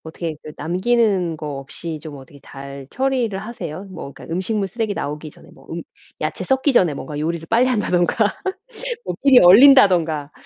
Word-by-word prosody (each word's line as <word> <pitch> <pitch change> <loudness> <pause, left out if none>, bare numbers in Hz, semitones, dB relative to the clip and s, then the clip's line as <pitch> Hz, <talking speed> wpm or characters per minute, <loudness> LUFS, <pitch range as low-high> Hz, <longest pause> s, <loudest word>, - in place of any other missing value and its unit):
어떻게 160 0 -5
그 155 - -9
남기는 185 0 +1
거 150 - -7
없이 155 +3 -7
좀 155 -3 -8
어떻게 135 +2 -15
잘 140 0 -10
처리를 255 -6 -1
하세요? 200 -5 -7
뭐 180 -7 -9
그니까 165 - -10
음식물 195 +2 -1
쓰레기 225 -2 -2
나오기 150 +1 -5
전에 - - -18
뭐 - - -19
음 - - -5 0.4
야채 - - -3
썩기 265 +1 +2
전에 175 -10 +3
뭔가 150 +1 -6
요리를 165 +1 -3
빨리 235 +3 +3
한다든가 210 -2 +1 0.7
뭐 - - -3
미리 270 -3 +7
얼린다든가 180 - +6
175 Hz, 360 characters per minute, -20 LUFS, 155-225 Hz, 0.7 s, 미리